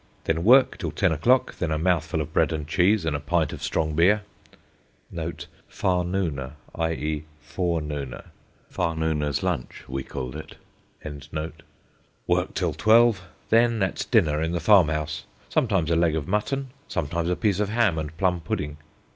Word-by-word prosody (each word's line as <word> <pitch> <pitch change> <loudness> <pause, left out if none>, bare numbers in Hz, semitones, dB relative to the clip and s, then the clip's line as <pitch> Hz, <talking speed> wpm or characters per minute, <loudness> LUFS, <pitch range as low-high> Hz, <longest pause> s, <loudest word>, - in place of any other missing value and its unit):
Then 80 +1 0
work 130 +5 +5
till 85 - -2
ten 85 +4 +1
o'clock: 120 - +2
then 85 - -1
a 80 - 0
mouthful 80 -2 +1
of 75 - -6
bread - - +3
and 75 -2 -3
cheese 95 +3 +2
and 80 -3 0
a - - -1
pint 80 +2 0
of - - -8
strong 80 -1 -1
beer 95 +7 +4 0.9
['farnooner,' 90 -7 -3 0.2
i.e., 80 -2 -2
forenooner; 75 -3 -3 0.4
'farnooner's 80 -3 -1
lunch,' - - -3
we 65 +1 -3
called 65 0 -6
it]. 75 - -8 1.7
Work - - 0
till - - 0
twelve. 115 -2 +4 0.3
Then 115 -2 +4
at 95 - -2
dinner 75 0 +3
in 80 +1 -1
the 85 - 0
farm 90 0 +6
house; 75 -1 -3 0.2
sometimes 95 -9 +1
a - - +3
leg 85 -1 +2
of 80 -2 -3
mutton, 130 +7 -1 0.2
sometimes 85 0 -2
a 90 - +1
piece 100 +2 +1
of 105 -1 0
ham 110 -7 +2
and 80 +1 -6
plum 90 -2 +1
pudding. 75 -2 -3
85 Hz, 155 wpm, -25 LUFS, 75-95 Hz, 1.7 s, farm